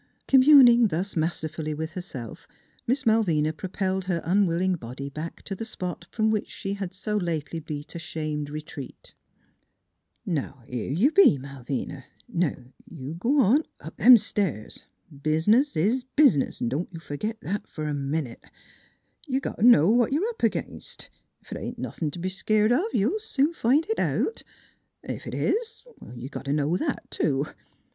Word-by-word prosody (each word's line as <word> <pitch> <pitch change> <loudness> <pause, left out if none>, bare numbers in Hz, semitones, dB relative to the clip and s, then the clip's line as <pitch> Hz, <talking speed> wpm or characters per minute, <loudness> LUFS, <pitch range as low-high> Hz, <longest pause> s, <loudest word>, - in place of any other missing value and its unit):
Communing 255 -4 +7
thus 185 +2 -3
masterfully 155 -1 -2
with 160 +2 -4
herself, 150 - -8 0.4
Miss 260 +3 0
Malvina 170 -9 +2
propelled 190 +2 -2
her 180 -2 0
unwilling 185 0 +2
body 135 -2 -6
back 155 +4 -7
to 195 - -4
the 195 - -5
spot 180 -6 -6
from 220 -1 +1
which 215 -2 -1
she 195 - -4
had 195 -3 -4
so 210 +3 -4
lately 165 -3 -2
beat 150 -2 -7
a 170 - -5
shamed 155 -2 -4
retreat. 150 -3 -8 0.6
" - - -51
Now, 140 -7 -3
here 125 -1 -4
you 205 - +3
be, 375 - +6
Malvina; 135 0 -6 0.2
now 180 -9 0 0.3
you 140 -1 -7
g' 170 +6 -10
on 275 0 +4 0.2
up - - -10
them 250 0 +9
stairs. 195 - -3 0.3
Bizniz 160 - +2
is 225 +11 +2
bizniz; 240 - +3
don't 140 +9 -2
you 165 - -8
fergit 210 +9 -4
that 205 +2 -4
f'r 155 -1 -5
a 150 - -1
minute. 140 -2 -3 0.8
You 265 -1 0
got - - -5
t' 220 - +3
know 170 -10 +7
what 240 0 +3
you're 340 +11 +1
up 465 - -8
against; - - -3 0.3
ef - - -18
it - - -4
ain't - - -6
nothin' 155 - -3
t' 160 - -7
be 185 +2 -2
skeered 215 +3 +2
of 290 - +3
you'll 225 - +1
soon 320 -8 0
find 285 +2 +2
it 445 - -1
out. 445 - 0 0.6
Ef - - -6
it - - -4
is, 450 0 -1 0.3
you 120 +2 -7
got 140 - -7
t' 140 - 0
know 150 +3 +1
that, 290 - -2
too. 140 -2 0
180 Hz, 165 wpm, -26 LUFS, 150-230 Hz, 0.8 s, them